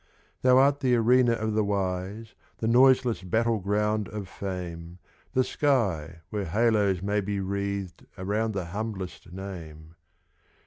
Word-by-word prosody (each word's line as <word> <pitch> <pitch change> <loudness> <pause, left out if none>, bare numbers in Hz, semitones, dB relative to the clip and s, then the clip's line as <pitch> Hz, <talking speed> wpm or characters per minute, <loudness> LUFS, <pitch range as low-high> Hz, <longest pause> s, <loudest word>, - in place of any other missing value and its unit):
Thou 130 0 +5
art 140 +2 +4
the 125 -3 +3
arena 120 +1 +4
of 110 -1 -2
the 110 0 +2
wise, 100 +2 -3 0.2
The 110 - -2
noiseless 125 -1 +4
battle 110 +5 +1
ground 105 +2 0
of 105 -3 -6
fame; 90 -3 -6 0.4
The 130 - +3
sky 95 - 0
where 105 -2 -2
halos 105 -1 +2
may 105 +1 +1
be 100 0 -2
wreathed 100 -2 -3
Around 105 +4 -1
the 95 -3 -3
humblest 100 -5 -5
name. 85 -5 -8
100 Hz, 135 wpm, -27 LUFS, 95-115 Hz, 0.4 s, Thou